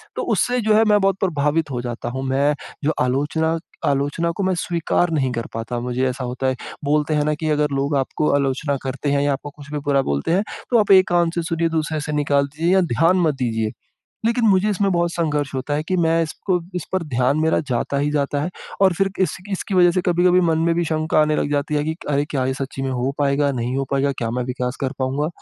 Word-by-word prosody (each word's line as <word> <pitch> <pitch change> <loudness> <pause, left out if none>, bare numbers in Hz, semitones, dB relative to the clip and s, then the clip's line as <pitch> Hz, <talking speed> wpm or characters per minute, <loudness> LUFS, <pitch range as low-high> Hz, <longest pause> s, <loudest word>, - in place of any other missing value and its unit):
तो - - -2
उससे 250 0 +1
जो 215 0 +2
है 220 - +5
मैं 210 -1 +4
बहुत 195 -1 +2
प्रभावित 155 -3 0
हो 120 -1 -2
जाता 120 -1 -5
हूँ। 130 +2 -4
मैं 140 +3 +2 0.3
जो 155 - +2
आलोचना 150 +5 0 0.3
आलोचना 145 +5 0
को 195 - -3
मैं 185 0 +1
स्वीकार 170 +1 0
नहीं 135 -5 +1
कर 115 -1 -3
पाता। 115 +2 -3
मुझे 125 +2 -1
ऐसा 125 +1 -5
होता 125 +2 -2
है, 130 - +1 0.3
बोलते 150 +1 +1
हैं 150 -1 +2
ना 150 - +1
कि 155 +1 -3
अगर 150 0 +2
लोग 140 +1 0
आपको 135 +3 0
आलोचना 140 +1 0
करते 135 +2 -2
हैं 140 0 +2
या 145 -1 +2
आपको 145 +2 -6
कुछ 145 -1 -12
भी 150 - -2
बुरा 140 -1 +3
बोलते 70 - -1
हैं 190 +4 +3 0.3
तो 240 - +4
आप 205 -1 +2
एक 190 0 +7
कान 175 -1 +2
से 170 - 0
सुनिए, 165 0 0
दूसरे 155 -1 -1
से 150 - -4
निकाल 140 -1 +2
दीजिए 165 +6 0
या 190 - +5
ध्यान 165 +8 +3
मत 155 -3 +2
दीजिए। 115 -4 -1 0.6
लेकिन 235 0 +1
मुझे 195 +2 +3
इसमें 195 0 +1
बहुत 170 0 +1
संघर्ष 150 -4 -1
होता 135 +3 -2
है 150 - 0
कि 185 - +1
मैं 165 -1 +2
इसको 180 +3 -1 0.2
इस 175 -4 -3
पर 185 -2 0
ध्यान 130 +1 +1
मेरा 160 0 +2
जाता 125 +3 -1
ही 145 +1 0
जाता 145 -1 0
है। 175 - -2 0.3
और 190 -2 +6
फिर 195 +3 +1
इस - - 0 0.2
इसकी 195 +1 -3
वज़ह 175 -1 +6
से 185 - +1
कभी-कभी 180 +1 +4
मन 165 -2 +2
में 165 - +2
भी 170 0 0
शंका 155 0 +1
आने 150 0 +2
लग 145 - -1
जाती 145 +1 -1
है 145 0 +1
कि 160 +1 -2
अरे! 145 0 +1
क्या 130 -3 0
ये 130 - -1
सच्ची 135 0 -5
में 135 - -1
हो 130 +2 -1
पाएगा, 140 0 +2
नहीं 125 +1 -2
हो 135 - 0
पाएगा? 140 0 +1
क्या 115 -3 -3
मैं 125 +1 -2
विकास 125 0 -3
कर 135 -2 -1
पाऊँगा? 135 +4 -1
150 Hz, 245 wpm, -21 LUFS, 135-170 Hz, 0.6 s, एक